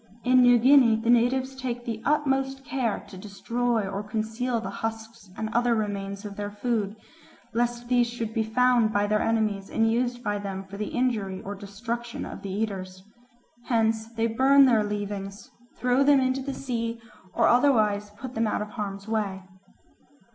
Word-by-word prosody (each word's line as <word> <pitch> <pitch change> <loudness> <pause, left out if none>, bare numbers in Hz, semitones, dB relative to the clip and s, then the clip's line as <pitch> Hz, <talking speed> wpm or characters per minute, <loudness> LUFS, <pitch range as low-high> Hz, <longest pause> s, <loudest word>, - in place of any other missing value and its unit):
In 255 0 +5
New 245 -1 +7
Guinea 250 -1 +6
the 225 +2 +1
natives 260 +3 +2
take 245 -2 -4
the 225 -2 -4
utmost 270 -2 0
care 260 -7 -1
to 190 - -11
destroy 225 +2 -1
or 195 +1 -3
conceal 225 +3 -2
the 225 - -5
husks 225 -1 -6
and 220 - -2
other 240 0 +2
remains 200 -1 -3
of 205 -1 -7
their 205 0 -3
food, 210 -1 -2 0.6
lest 240 0 -1
these 245 -1 +3
should 230 -2 -5
be 225 - +1
found 235 0 +3
by 205 -1 +1
their 215 +1 +1
enemies 215 -3 0
and 225 0 +2
used 245 +1 -1
by 205 -2 -1
them 195 -1 -5
for 195 +1 -10
the 210 0 -3
injury 215 -7 -1
or 200 - -5
destruction 230 +4 -5
of - - -8
the 200 - -6
eaters. 190 -2 -4 0.6
Hence 225 -1 0
they 230 0 -1
burn 270 +5 +5
their 230 -5 +4
leavings, 205 -1 -5 0.3
throw 250 +2 +2
them 285 0 +5
into 260 +1 0
the 270 0 -4
sea, 230 -3 -3 0.4
or 230 - +4
otherwise 215 -6 +3
put 255 +2 -7
them 225 -1 0
out 210 - -1
of 210 - -9
harm's 200 -2 -5
way. 205 -4 -2
225 Hz, 175 wpm, -26 LUFS, 205-245 Hz, 0.6 s, New